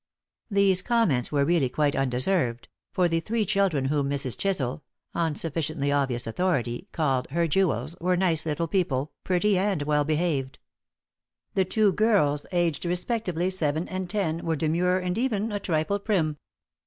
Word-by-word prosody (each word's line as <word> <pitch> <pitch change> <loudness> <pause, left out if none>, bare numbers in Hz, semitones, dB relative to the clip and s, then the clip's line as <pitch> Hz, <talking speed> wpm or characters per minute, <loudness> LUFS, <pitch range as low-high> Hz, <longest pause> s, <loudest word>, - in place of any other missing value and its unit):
These 200 -3 +3
comments 185 - +1
were 140 -2 +2
really 160 -6 +2
quite 145 +1 +1
undeserved; 130 -1 0 0.2
for 180 -1 +2
the 165 -1 +1
three 215 +5 -1
children 195 -9 +1
whom 140 0 0
Mrs. 135 -3 -1
Chisel 150 -9 -1 0.3
on 165 -3 0
sufficiently 155 -2 -2
obvious 135 -4 0
authority 125 - -1
called 135 -5 0
"her 170 +4 +1
jewels" 155 - 0
were 180 +1 +2
nice 170 -4 +2
little 160 +1 -2
people, 155 -6 0
pretty 190 +1 +2
and 190 -6 0
well 150 0 +2
behaved. 150 -3 -1 1.0
The 190 - +2
two 210 +2 +2
girls, 195 -10 +2
aged 175 -5 0
respectively 180 0 -1
seven 160 -2 0
and 185 -1 -4
ten, 170 -6 -1
were 165 -1 0
demure 170 +4 +1
and 180 +2 -2
even 225 -4 0
a 205 - -2
trifle 175 +2 0
prim. 170 -8 0
165 Hz, 155 wpm, -26 LUFS, 145-190 Hz, 1.0 s, These